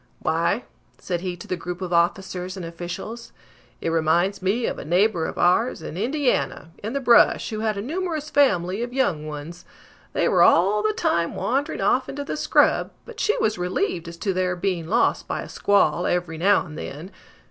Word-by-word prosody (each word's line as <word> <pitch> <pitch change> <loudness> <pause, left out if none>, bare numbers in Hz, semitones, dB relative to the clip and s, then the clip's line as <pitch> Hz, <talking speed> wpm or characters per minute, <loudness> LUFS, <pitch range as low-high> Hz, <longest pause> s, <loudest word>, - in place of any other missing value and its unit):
"Why," - - 0 0.3
said 175 -2 -3
he 180 -1 -4
to 170 - -11
the 185 - -1
group 180 0 -6
of 180 -2 -4
officers 180 +1 0
and 180 - -5
officials, 175 +7 -7 0.5
"it - - -1
reminds 170 +5 +1
me 210 +6 0
of - - -3
a - - -6
neighbor 175 +1 +2
of - - -7
ours, 180 +2 +2
in 155 - -6
Indiana, 245 - -1
in 215 +4 -4
the 280 - 0
brush, 240 -3 +4
who 215 - -3
had 215 -1 -1
a 200 - -3
numerous 315 +1 -3
family 200 -8 +2
of 240 +1 -4
young 175 - 0
ones. 155 +4 -8 0.5
They - - +1
were - - +3
all 195 +5 +5
the 215 0 +1
time 170 -4 0
wandering 280 +5 -1
off 255 +1 +2
into 285 +1 -4
the 285 - -4
scrub, - - +3 0.2
but - - -11
she 435 +3 +1
was 215 - 0
relieved 180 -1 -1
as 170 0 -8
to 195 +2 -1
their 185 0 0
being 175 -3 -2
lost 225 +7 +1
by - - -3
a - - -9
squall 200 -3 +2
every 175 -2 -1
now 195 +2 +3
and 155 -3 -9
then. 160 +7 -7
185 Hz, 195 wpm, -23 LUFS, 175-230 Hz, 0.5 s, all